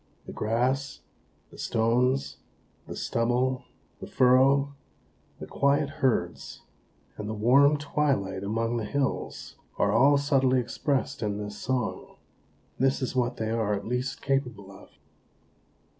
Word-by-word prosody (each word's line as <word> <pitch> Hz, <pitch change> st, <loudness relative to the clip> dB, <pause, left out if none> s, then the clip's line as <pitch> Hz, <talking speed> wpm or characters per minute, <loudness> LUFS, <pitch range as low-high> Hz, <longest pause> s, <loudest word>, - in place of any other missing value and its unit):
The -, -, -8 dB
grass, 125 Hz, +5 st, -1 dB, 0.5 s
the -, -, -14 dB
stones, 125 Hz, +4 st, +1 dB, 0.5 s
the -, -, -7 dB
stubble, 125 Hz, +2 st, 0 dB, 0.3 s
the -, -, -8 dB
furrow, 135 Hz, +2 st, +4 dB, 0.7 s
the -, -, -6 dB
quiet 140 Hz, 0 st, +1 dB
herds, 130 Hz, -3 st, -1 dB, 0.5 s
and 105 Hz, -, -5 dB
the 110 Hz, -, -3 dB
warm 140 Hz, +7 st, +4 dB
twilight 135 Hz, -10 st, -1 dB
among 115 Hz, +3 st, -1 dB
the 110 Hz, -, -3 dB
hills, 140 Hz, +5 st, -3 dB, 0.2 s
are -, -, +2 dB
all 140 Hz, +5 st, +5 dB
subtly 135 Hz, -2 st, +2 dB
expressed 140 Hz, +2 st, -2 dB
in 105 Hz, -2 st, -2 dB
this 105 Hz, 0 st, -6 dB
song; 125 Hz, -2 st, -3 dB, 0.6 s
this 135 Hz, +1 st, +1 dB
is 130 Hz, -, -3 dB
what 125 Hz, -1 st, 0 dB
they 110 Hz, 0 st, -2 dB
are 110 Hz, -2 st, 0 dB
at 100 Hz, -, -6 dB
least 125 Hz, +3 st, -3 dB
capable 125 Hz, -8 st, -2 dB
of." 95 Hz, -, -15 dB
125 Hz, 130 wpm, -27 LUFS, 110-135 Hz, 0.7 s, all